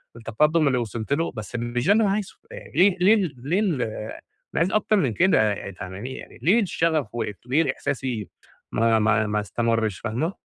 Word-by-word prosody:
التقدم 150 +8 +2
اللي 130 -2 +2
وصَلت 115 +2 -3
له، 165 +3 0
بس 110 0 -7
مش 120 +3 -2
ده 205 - +7
اللي 220 +1 +3
أنا 195 - +2
عايزه 205 -1 -3
آآ - - -10
ليه 185 +3 +4
ليه 200 -1 +4
ليه 150 +11 -1
ال 170 -12 0
أنا 110 +6 -6
عايز 180 - +2
أكتر 215 0 +2
من 140 - +1
كده 110 - +3
يي 100 - -7
فاهماني 95 +8 -7
يعني - - -11
ليه 215 +7 +4
الشغف 165 - 0
وقف 110 -3 -3
وليه 140 +3 +2
إحساسي 125 -8 -3 0.4
ما 115 0 +3
ما 110 0 +2
ما 105 0 0
استمرش؟ 115 -1 -1
فاهمة؟ 125 - -2
125 Hz, 190 wpm, -24 LUFS, 110-170 Hz, 0.4 s, ده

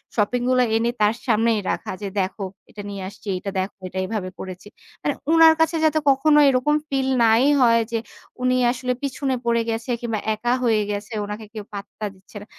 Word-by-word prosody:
Shopping 230 +3 +1
গুলো 255 -1 +4
এনে 230 +1 +2
তার 210 +1 +4
সামনেই 225 -1 +3
রাখা। - - -4
যে 200 - -3
"দেখো 195 +2 -4 0.3
এটা 210 - -9
নিয়ে 195 -2 -6
আসছি। 205 - -16
এটা 195 +1 -5
দেখো। 190 +2 -4
এটা 190 - -8
এভাবে 200 -3 -3
করেছি।" 185 +2 -8 0.4
মানে 290 - +1 0.2
ওনার 325 -1 +8
কাছে 320 +1 +2
যাতে 310 0 +3
কখনো 295 +3 +4
এরকম 270 +3 +2
ফিল 270 -1 0 0.2
নাই 225 +3 +5 0.2
হয় 230 -1 +5
যে 230 - 0 0.4
উনি 255 0 +2 0.2
আসলে 250 0 -3
পিছনে 270 -1 -1
পড়ে 235 0 +3
গেছে। 225 +2 -3
কিংবা 235 -1 -4 0.2
একা 240 +3 0
হয়ে 220 -3 +3
গেছে, 205 +2 -5
উনাকে 210 +1 -6
কেউ 215 -2 -6
পাত্তা 205 +1 -7
দিচ্ছে 190 +3 -23
না। - - -10
230 Hz, 190 wpm, -22 LUFS, 210-255 Hz, 0.4 s, ওনার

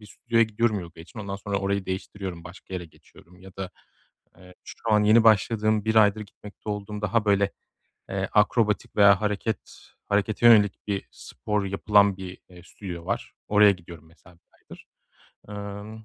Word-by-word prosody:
bir 105 - -14
stüdyoya 115 +2 0
gidiyorum 110 -1 0
yogaya 85 -2 -11
için 110 +8 -14
ondan 100 -1 -5
sonra 100 0 -3
orayı 100 0 -2
değiştiriyorum 95 -2 -6
başka 90 +1 -11
yere 90 -1 -4
geçiyorum 85 +3 -21
ya 95 0 -13
da, 95 -1 -5 0.7
eee, 90 0 -16
şu 115 - -4
an 105 0 +4
yeni 110 +2 +5
başladığım 110 0 +3
1 110 - 0
aydır 105 -1 +5
gitmekte 105 +1 -13
olduğum 105 0 -5
daha 105 +2 +1
böyle, 100 -1 +2 0.6
eee, 95 -1 -3
akrobatik 105 0 +1
veya 100 -1 +6
hareket 105 0 -3 0.3
harekete 105 +3 0
yönelik 105 -3 +4
bir 100 -1 -3
spor 105 -2 -4
yapılan 100 0 +3
bir, 95 -1 -8
eee, 90 -1 -15
stüdyo 90 -3 -9
var. - - -4 0.2
Oraya 105 0 +6
gidiyorum 85 -4 -10
mesela 85 +1 -21
1 85 - -31 0.2
aydır. - - -15 0.6
Emm, 105 +2 -8
100 Hz, 165 wpm, -25 LUFS, 95-105 Hz, 0.7 s, veya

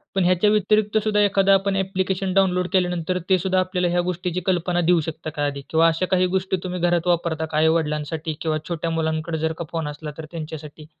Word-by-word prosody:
पण 190 - +2
ह्याच्या 185 +3 +3
व्यतिरिक्त 210 +1 +2
सुद्धा 210 -1 +2
एखादा 195 -1 +4
आपण 195 0 +2
ॲप्लिकेशन 190 0 -1
डाउनलोड 180 -2 +2
केल्यानंतर 180 -1 0
ते 190 - +5
सुद्धा 185 +1 0
आपल्याला 185 -1 0
ह्या 175 0 +2
गोष्टीची 180 0 -2
कल्पना 175 -1 +1
देऊ 170 0 +3
शकत 160 0 -5
का 145 0 0
आधी? 140 -1 -3
किंवा 165 +1 +4
अशा 165 +3 +1
काही 185 0 +3
गोष्टी 190 0 -1
तुम्ही 180 -1 -4
घरात 175 0 +1
वापरता 165 -2 0
का, 155 -1 -4
आई-वडिलांसाठी 155 0 0
किंवा 155 -1 0
छोट्या 170 -1 -2
मुलांकडे 160 0 -1
जर 160 +1 -1
का 170 - -3
फोन 165 -3 -2
असला 150 +1 -7
तर 160 - -5
त्यांच्यासाठी? 155 -2 -8
175 Hz, 200 wpm, -22 LUFS, 160-185 Hz, -, ते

